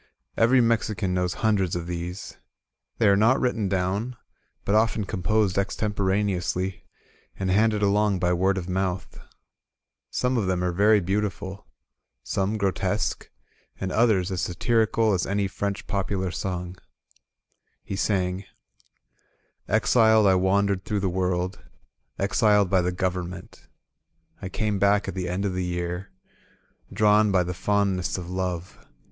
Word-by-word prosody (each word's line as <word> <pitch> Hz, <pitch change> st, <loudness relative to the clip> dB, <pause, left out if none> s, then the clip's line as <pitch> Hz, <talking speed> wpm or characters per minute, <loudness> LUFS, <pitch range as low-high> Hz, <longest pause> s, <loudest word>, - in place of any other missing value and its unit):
Every 125 Hz, +3 st, +4 dB
Mexican 105 Hz, -5 st, 0 dB
knows 90 Hz, -1 st, -1 dB
hundreds 95 Hz, -5 st, +2 dB
of 85 Hz, -1 st, -3 dB
these. 90 Hz, +2 st, -6 dB, 0.6 s
They 110 Hz, -, +3 dB
are 100 Hz, -, +6 dB
not 110 Hz, +6 st, +4 dB
writ 125 Hz, -1 st, +1 dB
ten 105 Hz, -4 st, -2 dB
down, 100 Hz, +6 st, -1 dB, 0.5 s
but 100 Hz, -, 0 dB
often 110 Hz, 0 st, +2 dB
composed 100 Hz, 0 st, 0 dB
extemporaneously, 95 Hz, -2 st, -1 dB, 0.5 s
and 95 Hz, -1 st, -1 dB
handed 105 Hz, +1 st, +2 dB
along 100 Hz, 0 st, +2 dB
by 90 Hz, -1 st, +1 dB
word 95 Hz, +2 st, +1 dB
of 90 Hz, -2 st, -4 dB
mouth. 95 Hz, 0 st, -3 dB, 0.9 s
Some 125 Hz, 0 st, 0 dB
of 105 Hz, -5 st, 0 dB
them 90 Hz, -1 st, 0 dB
are 90 Hz, -, +1 dB
88 105 Hz, +2 st, +4 dB
INSURGENT 100 Hz, +2 st, +1 dB
MEXICO 100 Hz, -1 st, -4 dB
yery 95 Hz, -, -5 dB
beautiful^ -, -, -28 dB, 0.6 s
some 100 Hz, +3 st, -1 dB
grotesque, 100 Hz, +1 st, -1 dB, 0.5 s
and 95 Hz, -1 st, -3 dB
others 105 Hz, -5 st, +2 dB
as 90 Hz, -2 st, -2 dB
satirical 110 Hz, +3 st, +1 dB
as 95 Hz, -, 0 dB
any 100 Hz, 0 st, 0 dB
French 100 Hz, +1 st, -4 dB
popular 95 Hz, -2 st, -2 dB
song* 90 Hz, 0 st, -4 dB, 1.1 s
He 100 Hz, -, -5 dB
sang: 95 Hz, -1 st, -1 dB, 1.2 s
"Exiled 110 Hz, +1 st, +4 dB
I 95 Hz, -, +5 dB
wandered 95 Hz, +1 st, +1 dB
through 105 Hz, +1 st, -2 dB
the 95 Hz, -, 0 dB
world 90 Hz, +1 st, -1 dB, 0.3 s
— 60 Hz, +3 st, -51 dB
Exiled 100 Hz, -1 st, +2 dB
by 95 Hz, -2 st, +4 dB
the 90 Hz, +1 st, 0 dB
government. 90 Hz, 0 st, -4 dB, 0.7 s
I 95 Hz, -, -5 dB
came 105 Hz, +1 st, -1 dB
back 100 Hz, +1 st, +3 dB
at -, -, -3 dB
the 90 Hz, -2 st, -3 dB
end 95 Hz, +3 st, -2 dB
of 95 Hz, -, -1 dB
the 90 Hz, 0 st, -2 dB
year. 90 Hz, +1 st, -3 dB, 0.8 s
Drawn 105 Hz, +1 st, +4 dB
by 95 Hz, -2 st, +3 dB
the 90 Hz, +1 st, -4 dB
fondness 95 Hz, 0 st, 0 dB
of 90 Hz, -1 st, -7 dB
love. 90 Hz, -1 st, -4 dB
95 Hz, 145 wpm, -25 LUFS, 90-105 Hz, 1.2 s, are